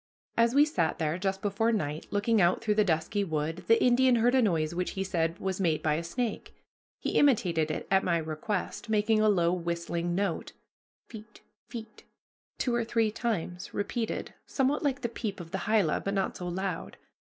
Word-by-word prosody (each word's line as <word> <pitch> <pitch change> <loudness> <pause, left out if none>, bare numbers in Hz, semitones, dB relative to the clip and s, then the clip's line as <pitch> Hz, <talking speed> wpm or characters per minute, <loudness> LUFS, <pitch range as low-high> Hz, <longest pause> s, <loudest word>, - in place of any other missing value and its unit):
As 230 +2 +3
we 290 +1 +7
sat 170 - 0
there, 160 +2 -1
just 195 0 -2
before 210 +3 +1
night, 155 -8 -2
looking 205 +1 +2
out 175 +1 +3
through 220 -2 +1
the 215 0 +4
dusky 175 +3 0
wood, 160 0 -2
the 230 - +5
Indian 250 0 +5
heard 240 +2 +3
a 260 - +5
noise 165 -7 +1
which 180 +1 -2
he 195 - -2
said 170 -3 -1
was 190 0 -3
made 160 -4 +1
by 155 - +2
a 160 +3 -1
snake. 230 +7 -4 0.4
He - - -3
imitated 180 - +3
it 155 - -4
at 190 0 +4
my 170 -2 +2
request, 165 +7 -3
making 215 0 +2
a 215 0 +4
low 175 -4 +3
whistling 170 0 -2
note 195 -3 -2 0.5
pheet 215 -1 -12 0.3
pheet 225 -3 -9 0.5
two 245 - 0
or 235 0 +1
three 225 -1 +1
times 185 -6 -3
repeated, 220 +3 -3
somewhat 275 +2 +1
like 280 -2 0
the 235 - 0
peep 215 -3 -5
of 165 -2 -9
the 190 - -4
hyla, 210 -8 +3
but 195 +1 -3
not 195 - -1
so 180 - -5
loud. 180 -1 -4
195 Hz, 190 wpm, -29 LUFS, 170-225 Hz, 0.5 s, we